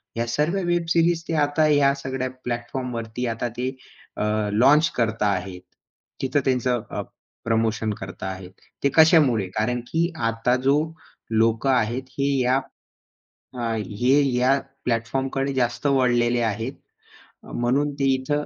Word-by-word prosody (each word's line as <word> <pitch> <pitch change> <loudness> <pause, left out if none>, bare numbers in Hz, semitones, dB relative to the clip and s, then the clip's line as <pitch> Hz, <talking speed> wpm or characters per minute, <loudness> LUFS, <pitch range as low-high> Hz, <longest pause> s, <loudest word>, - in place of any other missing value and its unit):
ह्या 115 0 -1
सर्व 150 +10 0
web 175 -1 +1
series 165 0 +2
ते - - -2
आता 145 +2 +2
या 145 -2 +4
सगळ्या 130 -1 -3
प्लॅटफॉर्मवरती 120 -1 -4
आता 115 +1 -2
ते 125 +1 -1 0.5
अ, - - -1 0.3
लॉन्च 145 +8 +5
करता 110 -3 0
आहेत. 95 -2 -2 0.6
तिथं 135 +2 +1
त्यांचं 125 -2 +1
अ, - - -3 0.4
प्रमोशन 110 -1 0
करता 95 0 -7
आहेत. 95 -1 -7 0.3
ते 140 - +4
कशामुळे? 150 - +5
कारण 120 +3 0
की 170 +2 +1 0.2
आता 115 +2 +1
जो 140 - +5 0.6
लोक 115 +3 +2
आहेत, 125 -1 +1 0.2
हे 140 +1 +2
या 125 +2 +3 1.0
अ, 115 -1 -1
हे 125 +7 +2 0.2
या 130 +3 +3 0.3
प्लॅटफॉर्मकडे 135 +4 -1
जास्त 120 +1 -1
वळलेले 120 -3 +2
आहेत. 115 +3 -2 0.7
अ, - - -12
म्हणून 135 +5 0
ते 140 - +1
इथं 145 +3 -1
125 Hz, 135 wpm, -23 LUFS, 115-140 Hz, 1.0 s, लॉन्च